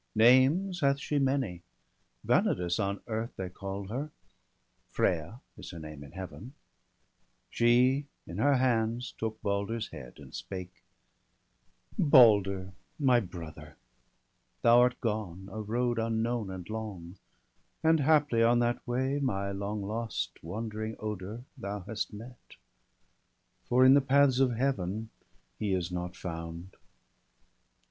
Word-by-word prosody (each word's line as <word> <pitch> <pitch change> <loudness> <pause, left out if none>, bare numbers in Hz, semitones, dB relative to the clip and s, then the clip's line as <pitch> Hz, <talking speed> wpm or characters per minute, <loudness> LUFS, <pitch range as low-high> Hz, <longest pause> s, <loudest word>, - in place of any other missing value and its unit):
Names 135 - +5
hath 140 -3 +3
she 145 0 -1
many; 130 -10 0 0.6
Vanadis 90 +1 +2
on 100 -1 -1
earth 115 0 -4
They 95 -1 -4
call 95 +1 -6
her, 135 +7 -3 0.8
Freya 90 - -1 0.2
is - - -9
her 85 - -8
name 75 -2 -8
in 70 - -13
Heaven; 95 - -8 1.0
She 125 +4 +3 0.2
in - - -7
her 145 -1 +4
hands 120 -1 0
took 110 -1 -3
Balder's 100 +3 -1
head, 70 -7 -10
and - - -13
spake: 90 -1 -7 0.6
— - - -26
'Balder, 100 - +5 0.2
my 130 -6 +4
brother, 85 -6 -9 0.9
thou 120 +1 +7
art 125 0 +3
gone 100 -5 -3
a 110 +2 -5
road 120 +2 0
Unknown 115 -1 -1
and 95 -2 -7
long, 100 -5 -6 0.7
and 160 0 +4
haply 145 -5 +3
on 120 +1 +5
that 120 0 +1
way 130 +3 0
My 100 -8 -1
long 100 +1 -3
lost 110 +3 -3
wandering 110 +4 -4
Oder 105 +2 -5
thou 105 -5 -5
hast 110 +4 -4
met, 115 +4 -12 1.1
For 130 +1 +5
in 130 - +8
the 140 - +6
paths 135 -1 +4
of 130 -2 +3
Heaven 110 -4 -1 0.5
he 105 -3 0
is 90 -1 -2
not 90 0 -4
found. 85 +1 -7
110 Hz, 130 wpm, -30 LUFS, 95-125 Hz, 1.1 s, in